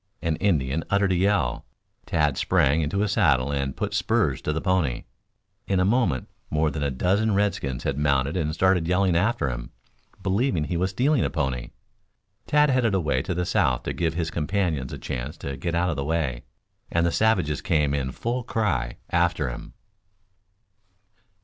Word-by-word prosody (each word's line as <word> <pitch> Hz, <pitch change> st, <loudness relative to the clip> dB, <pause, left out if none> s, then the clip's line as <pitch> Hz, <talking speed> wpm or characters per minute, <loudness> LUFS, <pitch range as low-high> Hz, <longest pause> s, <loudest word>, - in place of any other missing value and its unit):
An 80 Hz, -1 st, +1 dB
Indian 80 Hz, -6 st, +1 dB
uttered 100 Hz, -1 st, +2 dB
a -, -, +2 dB
yell. 90 Hz, -9 st, +1 dB, 0.4 s
Tad 75 Hz, -4 st, +1 dB
sprang 70 Hz, +4 st, +2 dB
into 80 Hz, +7 st, -1 dB
his 105 Hz, -1 st, +1 dB
saddle 70 Hz, -, +3 dB
and 70 Hz, -2 st, -2 dB
put -, -, -2 dB
spurs 70 Hz, -4 st, +1 dB
to -, -, -1 dB
the 80 Hz, -, -1 dB
pony. 90 Hz, -9 st, 0 dB, 0.6 s
In 95 Hz, -2 st, +1 dB
a 90 Hz, -, +3 dB
moment 100 Hz, -, +1 dB, 0.2 s
more 75 Hz, 0 st, +1 dB
than 75 Hz, -, -4 dB
a 70 Hz, -, +1 dB
dozen 95 Hz, +10 st, +1 dB
redskins 85 Hz, -11 st, -1 dB
had 70 Hz, +1 st, -1 dB
mounted 70 Hz, 0 st, +1 dB
and 75 Hz, -1 st, 0 dB
started 90 Hz, 0 st, +2 dB
yelling 90 Hz, 0 st, +2 dB
after 95 Hz, -4 st, +1 dB
him, -, -, -4 dB, 0.5 s
believing 95 Hz, -, +1 dB
he 85 Hz, -, -3 dB
was 90 Hz, +3 st, +1 dB
stealing 130 Hz, +7 st, +2 dB
a -, -, 0 dB
pony. 65 Hz, -6 st, -2 dB, 0.8 s
Tad 150 Hz, -1 st, +4 dB
headed 120 Hz, -6 st, +2 dB
away 75 Hz, -8 st, +1 dB
to 90 Hz, +5 st, -3 dB
the 90 Hz, +1 st, -1 dB
south -, -, +1 dB
to -, -, -3 dB
give 80 Hz, -2 st, -1 dB
his 85 Hz, -1 st, -2 dB
companions 80 Hz, -5 st, -1 dB
a -, -, -5 dB
chance 65 Hz, +3 st, -5 dB
to 70 Hz, -, -5 dB
get 85 Hz, +4 st, -3 dB
out 90 Hz, +1 st, +1 dB
of 75 Hz, -, -4 dB
the 70 Hz, -, -1 dB
way, 70 Hz, -6 st, -2 dB, 0.5 s
and 85 Hz, 0 st, +2 dB
the 85 Hz, -, +2 dB
savages 90 Hz, -, +1 dB
came 75 Hz, -3 st, +1 dB
in 65 Hz, -2 st, -1 dB
full 120 Hz, -, -2 dB
cry 85 Hz, -, -1 dB
after 85 Hz, -5 st, +1 dB
him. -, -, -9 dB
80 Hz, 180 wpm, -25 LUFS, 70-95 Hz, 0.8 s, Tad